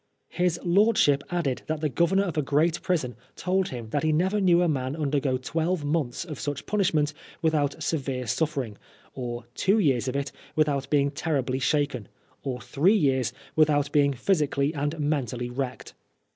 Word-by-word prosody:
His 175 -1 0
lordship 175 -6 +4
added 165 -8 -1
that 155 0 -2
the 155 - +2
Governor 170 +8 +2
of 180 -4 -3
a 155 - +2
great 155 +4 +1
prison 150 -9 -1 0.2
told 185 0 0
him 115 -4 -7
that 145 - +1
he 155 - +2
never 190 +7 +1
knew 175 -2 +5
a - - +2
man 135 -3 -1
undergo 140 -3 0
twelve 160 +5 -1
months 145 -2 -1
of 155 -6 -7
such 145 -1 -4
punishment 165 -8 +1 0.3
without 150 -3 +1
severe 135 -5 -2
suffering, 125 -3 -2 0.3
or 120 -2 -5
two 195 +3 +2
years 135 - +2
of 130 - -2
it 140 -1 -2 0.2
without 140 -3 +1
being 140 -1 +2
terribly 140 -4 -1
shaken, 140 -5 0 0.3
or 130 -2 -3
three 180 +10 +3
years 130 - +2 0.2
without 150 -2 +3
being 145 -2 +4
physically 145 -1 +1
and 145 +1 -2
mentally 125 -5 -1
wrecked. 130 0 -4
145 Hz, 165 wpm, -26 LUFS, 135-165 Hz, 0.3 s, knew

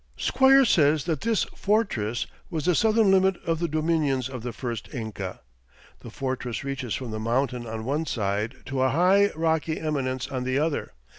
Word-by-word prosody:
Squier 270 0 +5
says 150 - +3
that 160 -4 -2
this 225 -2 +1
"fortress" 120 - 0 0.2
was 160 -5 -3
"the 180 - +4
southern 220 +1 +3
limit 190 -1 +4
of 165 -2 0
the 170 - 0
dominions 155 -5 0
of 130 -3 -6
the 120 +1 -4
first 120 -2 -5
Inca." 105 -6 -5 0.6
"The - - -10
fortress 130 -3 -4
reaches 135 -4 -3
from 125 -4 -5
the 110 - -4
mountain, 120 +1 -1
on 110 0 -5
one 150 +5 -1
side, 105 +2 -1
to 130 0 -2
a 130 - +3
high, 190 +7 +4
rocky 160 0 0
eminence 135 -4 -2
on 130 -2 -3
the 130 +1 0
other. 150 +1 -1
140 Hz, 175 wpm, -26 LUFS, 125-165 Hz, 0.6 s, Squier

